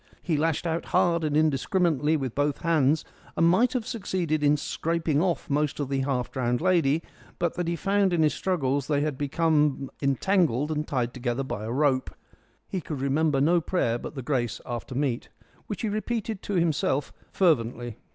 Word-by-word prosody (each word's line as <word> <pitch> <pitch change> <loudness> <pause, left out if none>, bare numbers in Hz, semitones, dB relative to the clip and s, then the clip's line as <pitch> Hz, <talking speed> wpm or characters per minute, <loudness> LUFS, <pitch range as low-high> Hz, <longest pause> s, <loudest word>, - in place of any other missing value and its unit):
He 165 - 0
lashed 160 +2 0
out 165 0 -1
hard 170 -1 +2
and 150 -1 +1
indiscriminately 155 0 +2
with 130 -5 -3
both 145 0 0
hands, 160 -3 +2 0.3
and 165 - +4
might 225 +9 +3
have 245 -4 -1
succeeded 180 - -2
in 145 +1 +4
scraping 160 0 -1
off 175 -2 0
most 150 -1 0
of 140 -2 -2
the 135 -1 0
half 130 -2 -1
drowned 120 -2 0
lady, 165 -4 +2 0.3
but 170 - 0
that 175 -1 -3
he 170 - 0
found 195 +2 +1
in 170 -2 +2
his 150 - +3
struggles 140 -7 -1
they 145 -2 +1
had 150 0 0
both 130 - -15
become 150 -4 +1
entangled 150 - +1
and 150 0 -2
tied 125 -3 -1
together 125 +1 -2
by 110 -5 -5
a 115 - -4
rope. 135 0 +1 0.6
He 185 - -3
could 150 -3 -5
remember 140 +2 +1
no 170 +5 +3
prayer 120 -9 0
but - - -8
the 135 - -5
grace 125 -4 -1
after 120 +1 -5
meat, 130 -3 -1 0.4
which 210 - -5
he - - +1
repeated 215 -1 -3
to 205 - -3
himself 155 -5 +1 0.2
fervently. 120 - +1
150 Hz, 185 wpm, -26 LUFS, 135-170 Hz, 0.6 s, and